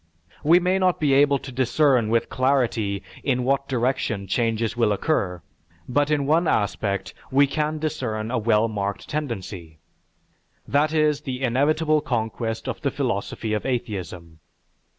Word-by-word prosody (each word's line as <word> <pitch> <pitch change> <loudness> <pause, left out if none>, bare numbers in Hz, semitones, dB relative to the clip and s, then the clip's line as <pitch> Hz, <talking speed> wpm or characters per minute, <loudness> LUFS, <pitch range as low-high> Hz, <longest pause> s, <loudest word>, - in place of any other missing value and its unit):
We 165 +4 +6
may 180 +2 +1
not 185 -1 +2
be 145 -3 +2
able 140 +1 +5
to 135 - -9
discern 130 -2 +2
with 115 0 +1
clarity 120 -7 0 0.2
in 125 -3 0
what 140 +2 +1
direction 120 -5 -1
changes 115 +2 0
will 115 -3 +2
occur, 100 - -1 0.4
but 145 +3 +1
in 145 -2 +1
one 160 +4 +2
aspect 100 -2 -1 0.2
we 140 +2 +5
can 150 +2 -1
discern 120 -8 -3
a 125 - 0
well 110 0 +2
marked 100 -2 -4
tendency. 95 - -5 0.9
That 145 +2 +2
is 155 -2 +2
the 130 0 -5
inevitable 150 +5 +2
conquest 115 -4 -3
of - - -4
the - - +1
philosophy 110 -1 -2
of 105 - -1
atheism. 90 -10 -4
125 Hz, 145 wpm, -24 LUFS, 110-145 Hz, 0.9 s, We